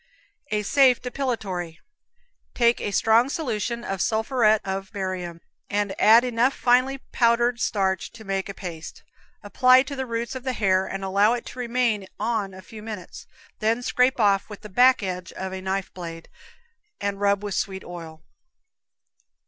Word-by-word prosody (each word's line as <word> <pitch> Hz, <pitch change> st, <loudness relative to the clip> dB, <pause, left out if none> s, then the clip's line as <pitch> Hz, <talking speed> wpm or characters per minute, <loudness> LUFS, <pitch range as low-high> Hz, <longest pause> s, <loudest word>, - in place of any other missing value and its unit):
A 210 Hz, -3 st, -1 dB
Safe 260 Hz, +2 st, +4 dB
Depilatory. 215 Hz, -11 st, -4 dB, 0.8 s
Take 235 Hz, -1 st, +3 dB
a -, -, -2 dB
strong 225 Hz, +5 st, +3 dB
solution 235 Hz, -5 st, -3 dB
of 195 Hz, -4 st, -3 dB
sulphuret 220 Hz, -1 st, +2 dB
of 195 Hz, 0 st, -4 dB
barium, 185 Hz, -4 st, -4 dB, 0.3 s
and 205 Hz, -1 st, -1 dB
add 225 Hz, +3 st, +7 dB
enough 250 Hz, +2 st, +1 dB
finely 255 Hz, +2 st, +2 dB
powdered 235 Hz, 0 st, +2 dB
starch 190 Hz, -5 st, 0 dB
to 230 Hz, -1 st, -12 dB
make 195 Hz, -1 st, -3 dB
a 200 Hz, -, -6 dB
paste. 165 Hz, -4 st, -8 dB, 0.4 s
Apply 255 Hz, +5 st, +5 dB
to 280 Hz, +1 st, -7 dB
the 265 Hz, -1 st, -4 dB
roots 235 Hz, +2 st, -3 dB
of 260 Hz, -1 st, -7 dB
the 260 Hz, -1 st, -2 dB
hair 190 Hz, -4 st, +1 dB
and 195 Hz, 0 st, -5 dB
allow 200 Hz, +4 st, +3 dB
it 245 Hz, -, -4 dB
to 255 Hz, -, -9 dB
remain 235 Hz, -5 st, 0 dB
on 210 Hz, -3 st, -1 dB
a 190 Hz, -, -11 dB
few 220 Hz, +2 st, -11 dB
minutes, 210 Hz, -5 st, -8 dB, 0.3 s
then 225 Hz, +3 st, 0 dB
scrape 250 Hz, +1 st, +2 dB
off 200 Hz, -2 st, +2 dB
with 210 Hz, -, -9 dB
the 210 Hz, -, -10 dB
back 250 Hz, +4 st, +4 dB
edge 180 Hz, -2 st, -4 dB
of 190 Hz, 0 st, -5 dB
a 190 Hz, -, -5 dB
knife 190 Hz, 0 st, -3 dB
blade, 165 Hz, -2 st, -8 dB, 0.7 s
and 200 Hz, 0 st, -2 dB
rub 200 Hz, 0 st, +2 dB
with 205 Hz, -1 st, -3 dB
sweet 190 Hz, +1 st, -3 dB
oil. 165 Hz, -3 st, -10 dB
210 Hz, 165 wpm, -24 LUFS, 190-240 Hz, 0.8 s, add